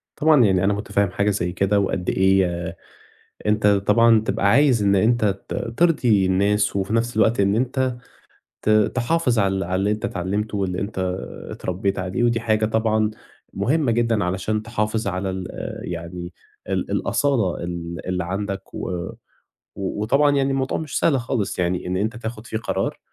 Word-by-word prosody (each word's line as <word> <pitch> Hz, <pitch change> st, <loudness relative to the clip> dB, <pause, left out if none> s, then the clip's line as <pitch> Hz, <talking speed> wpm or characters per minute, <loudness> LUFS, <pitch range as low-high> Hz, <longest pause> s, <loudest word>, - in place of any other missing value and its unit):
طبعًا 150 Hz, -4 st, +5 dB
يعني 95 Hz, -2 st, +2 dB
أنا 100 Hz, -, +3 dB
متفهّم 100 Hz, -1 st, 0 dB
حاجة 100 Hz, +2 st, +1 dB
زي 90 Hz, -3 st, -1 dB
كده 100 Hz, +3 st, +1 dB
وقد 95 Hz, -2 st, -1 dB
إيه 95 Hz, 0 st, +3 dB, 0.3 s
ي 85 Hz, -, -7 dB, 0.7 s
أنت 105 Hz, 0 st, +2 dB
طبعًا 110 Hz, +3 st, +4 dB
تبقى 105 Hz, -2 st, 0 dB
عايز 130 Hz, -1 st, +4 dB
إن 100 Hz, 0 st, +3 dB
أنت 115 Hz, +3 st, +3 dB, 0.2 s
ت -, -, -3 dB
ترضي 120 Hz, -, +2 dB
الناس، 100 Hz, +3 st, +2 dB
وفي 100 Hz, +2 st, -1 dB
نَفْس 120 Hz, +1 st, 0 dB
الوقت 110 Hz, +1 st, +3 dB
إن 100 Hz, +1 st, +3 dB
أنت 130 Hz, +2 st, 0 dB, 0.7 s
ت -, -, -1 dB
تحافظ 120 Hz, +5 st, +2 dB
على 95 Hz, -1 st, +2 dB
ال 95 Hz, -, -1 dB
على 90 Hz, +1 st, -2 dB
اللي 100 Hz, +2 st, +1 dB
أنت 105 Hz, 0 st, -2 dB
اتعلّمته 100 Hz, +4 st, -2 dB
واللي 90 Hz, -2 st, -1 dB
أنت 100 Hz, -1 st, -4 dB, 0.5 s
اتربّيت 95 Hz, +2 st, -2 dB
عليه، 95 Hz, +5 st, -2 dB
ودي 120 Hz, -1 st, +2 dB
حاجة 110 Hz, -1 st, +1 dB
طبعًا 110 Hz, -1 st, +1 dB, 0.4 s
مهمّة 145 Hz, -1 st, +1 dB
جدًا 115 Hz, -3 st, +1 dB
علشان 95 Hz, +4 st, -1 dB
تحافظ 110 Hz, -2 st, -2 dB
على 95 Hz, 0 st, -2 dB
ال 95 Hz, -1 st, -5 dB
آآ -, -, -6 dB
يعني 85 Hz, +1 st, -6 dB, 0.4 s
ال -, -, -2 dB
الأصالة 120 Hz, -13 st, 0 dB
ال 85 Hz, -1 st, -5 dB
اللي 90 Hz, -1 st, -1 dB
عَندك 95 Hz, +2 st, -4 dB
و -, -, -4 dB, 0.9 s
و 100 Hz, +1 st, -3 dB
وطبعًا 140 Hz, +6 st, +3 dB
يعني 135 Hz, 0 st, +1 dB
الموضوع 135 Hz, 0 st, -1 dB
مش 155 Hz, -4 st, -3 dB
سهل 135 Hz, -6 st, +2 dB
خالص 115 Hz, -4 st, -2 dB
يعني 90 Hz, 0 st, -1 dB
إن 90 Hz, +1 st, -1 dB
أنت 110 Hz, +5 st, -1 dB
تاخُد 115 Hz, -1 st, -6 dB
فيه 110 Hz, -, -3 dB
قرار، 110 Hz, -, -2 dB
105 Hz, 170 wpm, -22 LUFS, 95-115 Hz, 0.9 s, طبعًا